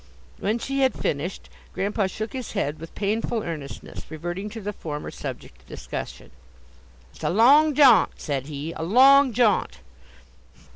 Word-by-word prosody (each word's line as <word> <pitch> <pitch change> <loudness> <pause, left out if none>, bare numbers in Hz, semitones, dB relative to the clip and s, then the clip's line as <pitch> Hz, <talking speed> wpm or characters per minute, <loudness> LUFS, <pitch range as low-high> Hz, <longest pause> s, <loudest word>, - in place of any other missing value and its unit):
When 215 +3 0
she 275 +3 -3
had 265 -1 +2
finished, 155 +6 -3 0.3
Grandpa 200 0 0
shook 220 +5 -6
his 260 -2 -6
head 155 -8 -2
with 165 +1 -11
painful 220 +2 -1
earnestness, 155 -5 -7
reverting 175 +6 -5
to 225 +2 -8
the 210 0 -5
former 150 -5 -6
subject - - -8
of - - -26
discussion. - - -7 0.8
"It's - - -14
a - - +1
long 280 - +5
jaunt!" 255 -9 +6
said 140 -3 -4
he; 150 +2 -5
"a - - -7
long 265 +9 +6
jaunt!" 225 -2 +1
205 Hz, 150 wpm, -24 LUFS, 165-245 Hz, 0.8 s, jaunt